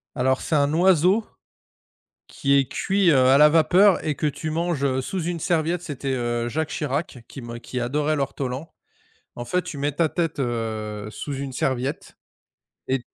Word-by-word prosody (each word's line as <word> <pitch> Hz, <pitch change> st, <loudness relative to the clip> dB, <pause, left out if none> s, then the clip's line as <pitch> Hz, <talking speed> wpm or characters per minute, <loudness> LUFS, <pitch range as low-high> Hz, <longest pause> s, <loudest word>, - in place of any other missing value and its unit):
Alors, 130 Hz, 0 st, +1 dB
c'est 155 Hz, -, 0 dB
un 145 Hz, +1 st, +2 dB
oiseau, 185 Hz, +4 st, +4 dB, 1.0 s
qui 140 Hz, 0 st, 0 dB
est 135 Hz, -, +3 dB
cuit, 195 Hz, -2 st, +2 dB
heu, 135 Hz, -, +4 dB
à 135 Hz, +1 st, +6 dB
la 150 Hz, +1 st, +7 dB
vapeur 180 Hz, +5 st, +4 dB
et 150 Hz, -2 st, 0 dB
que -, -, -3 dB
tu 155 Hz, +2 st, -4 dB
manges, 165 Hz, -3 st, -1 dB
heu, 130 Hz, -1 st, 0 dB
sous 185 Hz, +7 st, -4 dB
une 170 Hz, -1 st, -3 dB
serviette. 170 Hz, 0 st, 0 dB
C'était, 140 Hz, -5 st, -4 dB
heu, 120 Hz, -1 st, -1 dB
Jacques 155 Hz, +5 st, -2 dB
Chirac 145 Hz, -2 st, -3 dB
qui 135 Hz, -, -9 dB
me 120 Hz, 0 st, -7 dB
qui 125 Hz, +1 st, -6 dB
adorait 150 Hz, +5 st, 0 dB
l'ortolan. 135 Hz, +1 st, -4 dB, 0.6 s
En 120 Hz, 0 st, -7 dB
fait, 180 Hz, +7 st, 0 dB
tu 145 Hz, -, -7 dB
mets 145 Hz, +1 st, -1 dB
ta 160 Hz, +1 st, +1 dB
tête, 165 Hz, -4 st, -2 dB
heu, 110 Hz, -3 st, -3 dB
sous 140 Hz, +7 st, -6 dB
une 135 Hz, -1 st, -5 dB
serviette 130 Hz, +3 st, -3 dB, 0.7 s
et 130 Hz, -1 st, 0 dB
145 Hz, 180 wpm, -23 LUFS, 130-165 Hz, 1.0 s, la